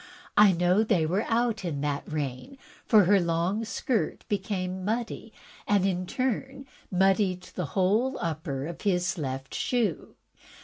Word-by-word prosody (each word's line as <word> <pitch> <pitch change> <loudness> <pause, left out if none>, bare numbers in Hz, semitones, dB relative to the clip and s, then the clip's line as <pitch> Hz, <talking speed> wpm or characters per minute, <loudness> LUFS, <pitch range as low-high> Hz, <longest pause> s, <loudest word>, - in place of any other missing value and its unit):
I 210 -1 +7
know 180 +2 +2
that 220 - +1
they 175 -8 +3
were 185 +7 0
out 230 -2 +1
in 155 -6 -3
that 145 0 -3
rain, 150 - -4 0.3
for 215 -3 +7
her 195 +3 +5
long 175 +5 0
skirt 220 -5 -2
became 190 -2 -2
muddy, 225 +1 -3 0.4
and 200 -2 +3
in 185 -2 -1
turn 265 +2 -2 0.2
muddied 190 0 +2
the 180 - -3
whole 220 +8 +2
upper 155 -5 -3
of 170 +1 -7
his 180 -3 0
left 135 -2 -4
shoe. 230 -10 -1
190 Hz, 145 wpm, -27 LUFS, 170-220 Hz, 0.4 s, I